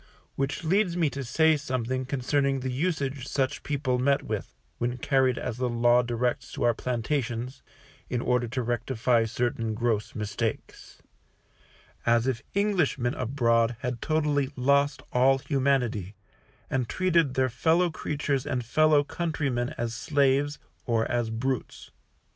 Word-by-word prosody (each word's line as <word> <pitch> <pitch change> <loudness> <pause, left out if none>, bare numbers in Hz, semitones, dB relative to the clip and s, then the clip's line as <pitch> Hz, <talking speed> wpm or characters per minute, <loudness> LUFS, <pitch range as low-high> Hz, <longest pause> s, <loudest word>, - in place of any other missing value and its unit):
Which 135 +3 -2
leads 180 +1 +2
me 160 -5 +2
to 140 - -4
say 160 +6 +3
something 130 -3 -2
concerning 135 +1 0
the 130 0 -2
usage 140 -3 -2
such 135 0 -1
people 135 -4 -1
met 140 +2 +2
with, - - -5 0.2
when 120 +1 -1
carried 130 -1 +2
as 115 - -4
the 125 0 0
Law 120 +1 +4
directs 120 0 -2
to - - -3
our 120 -1 +4
plantations, 125 +1 -2 0.5
in 125 - -1
order 125 0 +1
to 125 +2 -2
rectify 120 0 +1
certain 115 -1 -1
gross 110 -2 -1
mistakes; 105 +1 -4 1.0
as 115 0 +3
if 130 -3 -1
Englishmen 175 -12 +1
abroad 115 -2 +1
had 125 -1 -3
totally 150 -3 +1
lost 140 +2 +2
all 130 +2 +4
humanity, 130 - 0 0.5
and 130 -3 -1
treated 170 -7 +2
their 130 0 +3
fellow 165 +8 +2
creatures 145 -4 -2
and 125 -2 -2
fellow 155 +3 +4
countrymen 140 -7 -2
as 115 -1 -2
slaves, 140 +3 +1 0.3
or 115 -2 +2
as 120 -2 0
brutes. 125 +3 -3
130 Hz, 135 wpm, -27 LUFS, 120-145 Hz, 1.0 s, Law